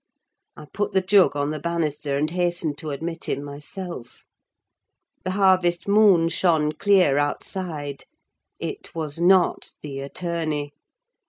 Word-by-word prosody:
I -, -, -10 dB
put 205 Hz, +7 st, -3 dB
the 190 Hz, -, +3 dB
jug 190 Hz, -3 st, +4 dB
on 145 Hz, +1 st, -1 dB
the 155 Hz, -, -4 dB
banister 150 Hz, -3 st, -2 dB
and 155 Hz, +2 st, 0 dB
hastened 175 Hz, -3 st, 0 dB
to 155 Hz, -, -6 dB
admit 165 Hz, +4 st, -4 dB
him 140 Hz, -, -2 dB
myself. 145 Hz, 0 st, -8 dB, 1.0 s
The 185 Hz, -, -2 dB
harvest 185 Hz, -3 st, +3 dB
moon 200 Hz, -5 st, +5 dB
shone 160 Hz, -3 st, +2 dB
clear 180 Hz, -6 st, +3 dB
outside. 145 Hz, -1 st, -3 dB, 0.5 s
It 410 Hz, -, -6 dB
was 155 Hz, -1 st, -3 dB
not 185 Hz, +1 st, +3 dB
the 140 Hz, -2 st, -6 dB
attorney. 150 Hz, 0 st, -3 dB
165 Hz, 130 wpm, -23 LUFS, 145-185 Hz, 1.0 s, moon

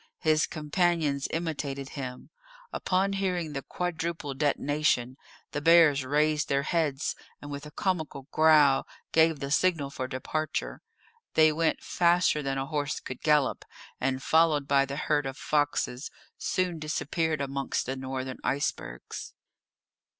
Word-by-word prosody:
His 155 Hz, -1 st, +3 dB
companions 155 Hz, -2 st, 0 dB
imitated 145 Hz, -5 st, -3 dB
him. 130 Hz, -3 st, -7 dB, 0.4 s
Upon 195 Hz, +2 st, 0 dB
hearing 180 Hz, -5 st, -1 dB
the 135 Hz, -, -3 dB
quadruple 165 Hz, -3 st, -3 dB
detonation 145 Hz, -2 st, +1 dB, 0.4 s
the 145 Hz, -, -3 dB
bears 160 Hz, -3 st, +6 dB
raised 150 Hz, +2 st, +1 dB
their 140 Hz, 0 st, +1 dB
heads, 155 Hz, -3 st, 0 dB, 0.2 s
and 145 Hz, -, -9 dB
with 145 Hz, +1 st, -6 dB
a -, -, -9 dB
comical 155 Hz, -6 st, -2 dB
growl 155 Hz, -3 st, +5 dB, 0.2 s
gave 160 Hz, -2 st, +4 dB
the 140 Hz, 0 st, -4 dB
signal 150 Hz, -4 st, +2 dB
for 130 Hz, -2 st, -4 dB
departure; 145 Hz, +4 st, -3 dB, 0.5 s
they 155 Hz, 0 st, +6 dB
went 160 Hz, +1 st, 0 dB
faster 175 Hz, -3 st, +2 dB
than 135 Hz, -1 st, -2 dB
a 135 Hz, -, -1 dB
horse 145 Hz, -1 st, -2 dB
could 130 Hz, -, -8 dB
gallop, 150 Hz, -3 st, +2 dB, 0.4 s
and, 130 Hz, 0 st, -1 dB
followed 155 Hz, -3 st, +3 dB
by 140 Hz, -1 st, +4 dB
the 140 Hz, 0 st, -5 dB
herd 145 Hz, -2 st, 0 dB
of 135 Hz, +1 st, -6 dB
foxes, 145 Hz, -3 st, -1 dB, 0.3 s
soon 180 Hz, -3 st, -1 dB
disappeared 155 Hz, +1 st, -1 dB
amongst 140 Hz, 0 st, -2 dB
the 130 Hz, -, -3 dB
northern 130 Hz, 0 st, -5 dB
icebergs. 130 Hz, -, -3 dB
150 Hz, 135 wpm, -28 LUFS, 140-160 Hz, 0.5 s, bears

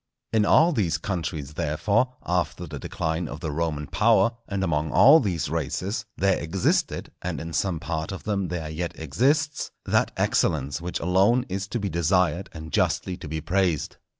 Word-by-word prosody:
In 110 Hz, -2 st, +3 dB
all 165 Hz, +3 st, +6 dB
these 90 Hz, -, +1 dB
countries, 80 Hz, -5 st, -4 dB
therefore, 100 Hz, -, 0 dB
after 90 Hz, 0 st, -1 dB
the 75 Hz, -3 st, -7 dB
decline 80 Hz, +4 st, -2 dB
of 75 Hz, -, -7 dB
the 80 Hz, -1 st, -3 dB
Roman 75 Hz, -1 st, -2 dB
power, 115 Hz, +6 st, +3 dB, 0.2 s
and 100 Hz, -1 st, -2 dB
among 75 Hz, -2 st, 0 dB
all 150 Hz, +4 st, +8 dB
these 95 Hz, -, -1 dB
races, 90 Hz, -, -2 dB
there 95 Hz, -1 st, +2 dB
existed, 85 Hz, +3 st, 0 dB
and -, -, -3 dB
in 85 Hz, +1 st, -6 dB
some 90 Hz, -3 st, 0 dB
part 80 Hz, +2 st, -3 dB
of 95 Hz, -, -7 dB
them 100 Hz, -3 st, -1 dB
there 85 Hz, -3 st, -4 dB
yet 85 Hz, +2 st, -4 dB
exists, 140 Hz, -, 0 dB, 0.2 s
that -, -, +2 dB
excellence 70 Hz, 0 st, +1 dB
which 90 Hz, +1 st, -3 dB
alone 95 Hz, +8 st, +3 dB
is 95 Hz, +1 st, -3 dB
to 110 Hz, +4 st, -3 dB
be 100 Hz, -, -2 dB
desired 90 Hz, +1 st, +1 dB
and 80 Hz, 0 st, -9 dB
justly 90 Hz, -, +1 dB
to 90 Hz, -4 st, -9 dB
be 80 Hz, +1 st, -4 dB
praised. 90 Hz, -3 st, 0 dB
90 Hz, 175 wpm, -25 LUFS, 80-100 Hz, 0.2 s, all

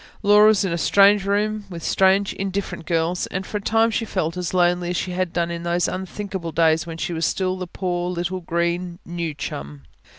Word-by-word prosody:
Laura 210 Hz, +1 st, +7 dB
was 215 Hz, -2 st, +4 dB
in 180 Hz, -, -1 dB
a 170 Hz, -, -2 dB
strange 200 Hz, +2 st, +5 dB
room, 210 Hz, +1 st, 0 dB
with 170 Hz, -3 st, -8 dB
strange, 195 Hz, +1 st, +3 dB
indifferent 195 Hz, -3 st, -4 dB
girls; 170 Hz, +1 st, 0 dB
and 185 Hz, +1 st, -4 dB
for 210 Hz, -, -3 dB
a -, -, -11 dB
time 225 Hz, +2 st, +2 dB
she 225 Hz, -, -1 dB
felt 180 Hz, -6 st, -2 dB
as 180 Hz, -1 st, -3 dB
lonely 175 Hz, -1 st, +2 dB
as 180 Hz, -, -1 dB
she 185 Hz, -, -2 dB
had 180 Hz, -1 st, -1 dB
done 170 Hz, 0 st, -1 dB
in 170 Hz, 0 st, -4 dB
those 170 Hz, 0 st, 0 dB
unthinkable 190 Hz, -2 st, -5 dB
days 165 Hz, +1 st, +2 dB
when 165 Hz, -1 st, -6 dB
she 170 Hz, -, -3 dB
was 165 Hz, 0 st, -3 dB
still 185 Hz, +1 st, 0 dB
the 185 Hz, -1 st, -5 dB
poor 175 Hz, -1 st, -2 dB
little 180 Hz, +1 st, -2 dB
green 170 Hz, +1 st, -2 dB
"new 170 Hz, -3 st, -4 dB
chum". 70 Hz, -, -6 dB
180 Hz, 210 wpm, -22 LUFS, 170-195 Hz, -, Laura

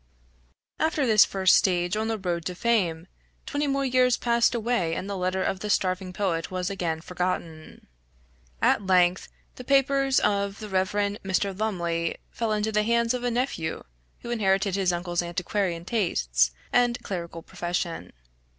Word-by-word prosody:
After 315 Hz, -3 st, +1 dB
this 215 Hz, -3 st, +6 dB
first 190 Hz, -1 st, +3 dB
stage 175 Hz, -2 st, +2 dB
on 220 Hz, +1 st, -1 dB
the 225 Hz, -1 st, -1 dB
road 175 Hz, -4 st, -2 dB
to 180 Hz, -, -3 dB
fame, 180 Hz, -7 st, 0 dB, 0.4 s
twenty 290 Hz, 0 st, -1 dB
more 275 Hz, 0 st, 0 dB
years 255 Hz, -1 st, +3 dB
passed 235 Hz, 0 st, +2 dB
away 225 Hz, -8 st, 0 dB
and 195 Hz, -, -4 dB
the 200 Hz, -, -3 dB
letter 185 Hz, 0 st, -1 dB
of 190 Hz, -, -1 dB
the 210 Hz, -, -5 dB
starving 185 Hz, -2 st, 0 dB
poet 180 Hz, -4 st, -2 dB
was 185 Hz, 0 st, -3 dB
again 170 Hz, -4 st, -2 dB
forgotten. 170 Hz, -3 st, -4 dB, 0.8 s
At -, -, +3 dB
length 180 Hz, -1 st, +3 dB, 0.3 s
the 250 Hz, -, -7 dB
papers 275 Hz, 0 st, +3 dB
of 200 Hz, -1 st, 0 dB
the 215 Hz, -1 st, -8 dB
Rev. 190 Hz, -1 st, +1 dB, 0.3 s
Mr. 195 Hz, 0 st, -1 dB
Lumley, 170 Hz, -5 st, -1 dB
fell 230 Hz, -2 st, -2 dB
into 215 Hz, +1 st, 0 dB
the 210 Hz, 0 st, +2 dB
hands 235 Hz, +2 st, +2 dB
of 250 Hz, -1 st, -3 dB
a 245 Hz, -, +1 dB
nephew, 235 Hz, -10 st, -2 dB, 0.4 s
who 235 Hz, -, -6 dB
inherited 195 Hz, -3 st, +1 dB
his 190 Hz, -2 st, +2 dB
uncle's 175 Hz, 0 st, -1 dB
antiquarian 175 Hz, 0 st, -2 dB
tastes, 60 Hz, -, +1 dB, 0.2 s
and 245 Hz, -1 st, +3 dB
clerical 170 Hz, -3 st, -5 dB
profession. 175 Hz, -1 st, -4 dB
195 Hz, 160 wpm, -26 LUFS, 175-230 Hz, 0.8 s, this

